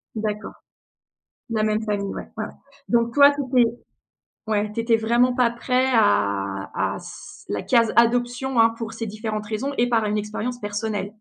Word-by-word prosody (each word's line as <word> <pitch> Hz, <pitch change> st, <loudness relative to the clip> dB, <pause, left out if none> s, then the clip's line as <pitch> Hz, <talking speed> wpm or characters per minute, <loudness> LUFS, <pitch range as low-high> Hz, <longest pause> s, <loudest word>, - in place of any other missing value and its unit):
D'accord, 215 Hz, -1 st, -3 dB, 1.0 s
la 215 Hz, -1 st, 0 dB
même 215 Hz, 0 st, +1 dB
famille, 205 Hz, -2 st, -2 dB
ouais, -, -, -7 dB
ouais. 215 Hz, -, -2 dB, 0.4 s
Donc 235 Hz, -1 st, +2 dB
toi, 285 Hz, 0 st, +7 dB
tu 285 Hz, -, -3 dB, 0.2 s
étais 230 Hz, -1 st, +3 dB, 0.8 s
ouais. 210 Hz, -1 st, 0 dB
Tu 230 Hz, -, -2 dB
étais 230 Hz, 0 st, +3 dB
vraiment 240 Hz, +3 st, +2 dB
pas 245 Hz, -2 st, +3 dB
prêt 250 Hz, +2 st, 0 dB
à 100 Hz, -, +1 dB, 0.2 s
à -, -, -6 dB
c -, -, -12 dB
à -, -, -1 dB
la 100 Hz, -, -2 dB
case 230 Hz, -3 st, +3 dB
adoption, 245 Hz, +1 st, +2 dB
hein, 225 Hz, 0 st, +6 dB
pour 225 Hz, -1 st, -6 dB
ces 225 Hz, 0 st, -5 dB
différentes 215 Hz, 0 st, -4 dB
raisons 230 Hz, +6 st, -3 dB
et 245 Hz, +1 st, +3 dB
par 225 Hz, -2 st, +2 dB
une 210 Hz, 0 st, 0 dB
expérience 215 Hz, +4 st, -4 dB
personnelle? 205 Hz, -1 st, -3 dB
225 Hz, 175 wpm, -23 LUFS, 210-240 Hz, 1.0 s, toi